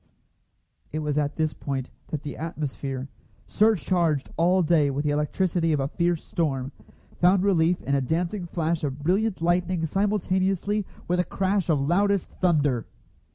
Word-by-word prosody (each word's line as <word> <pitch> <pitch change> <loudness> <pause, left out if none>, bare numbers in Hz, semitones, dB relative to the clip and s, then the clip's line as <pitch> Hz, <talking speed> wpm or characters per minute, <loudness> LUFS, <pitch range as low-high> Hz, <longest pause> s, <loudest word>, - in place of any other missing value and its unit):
It 155 - -3
was 150 -1 0
at 145 0 -1
this 155 -2 0
point 135 -1 -4 0.2
that 155 -2 -4
the 145 - -5
atmosphere, 140 -4 -4 0.4
surcharged 175 -8 +1
all 180 +2 +3
day 155 -3 +3
with 140 +2 -2
the 150 - +2
electricity 165 +3 +1
of 150 - +1
a 135 0 -1
fierce 170 0 0
storm, 135 -5 -2 0.5
found 180 +1 +4
relief 180 -3 +3
in 140 - -1
a 140 - +3
dancing 175 +7 -1
flash 165 -1 -1
of 140 0 -3
brilliant 190 +2 +1
lightning 175 0 +1
simultaneously 195 +1 0 0.2
with 180 +1 +1
a - - +4
crash 190 0 -1
of 155 -3 +3
loudest 195 +7 +1
thunder. 145 -9 +2
165 Hz, 155 wpm, -25 LUFS, 145-185 Hz, 0.5 s, found